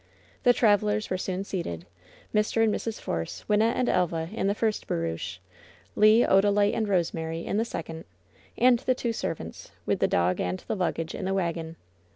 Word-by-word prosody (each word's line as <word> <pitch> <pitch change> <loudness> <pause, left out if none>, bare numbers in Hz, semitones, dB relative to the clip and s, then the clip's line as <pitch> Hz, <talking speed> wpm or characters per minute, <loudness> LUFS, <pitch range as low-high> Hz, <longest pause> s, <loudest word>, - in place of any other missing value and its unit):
The 245 - +6
travelers 210 -2 +2
were 185 - +1
soon 190 0 -2
seated 90 - -4 0.3
— - - -26
^Mr. 215 +1 +2
and 220 -2 +3
Mrs. 225 -1 -3
Force, 80 -1 -4
Wynnette 220 +2 +3
and 250 - 0
Elva 170 -3 0
in 210 - -1
the 200 - +1
first 220 -1 -1
barouche, 85 +2 -3 0.6
Le, 215 +3 +6
Odalite 205 +1 +4
and 220 -2 0
Rosemary 165 -3 -1
in - - -1
the 225 - +1
second, 165 -6 -6 0.5
and 245 -1 +5
the 255 - 0
two 235 -2 -2
servants, 165 - -5 0.2
with - - 0
the - - +3
dog 90 +1 +1
and 90 +1 -1
the - - -1
luggage, 165 -4 -2
in - - -5
the 195 +1 0
wagon. 170 -3 -2
195 Hz, 185 wpm, -27 LUFS, 165-215 Hz, 0.6 s, The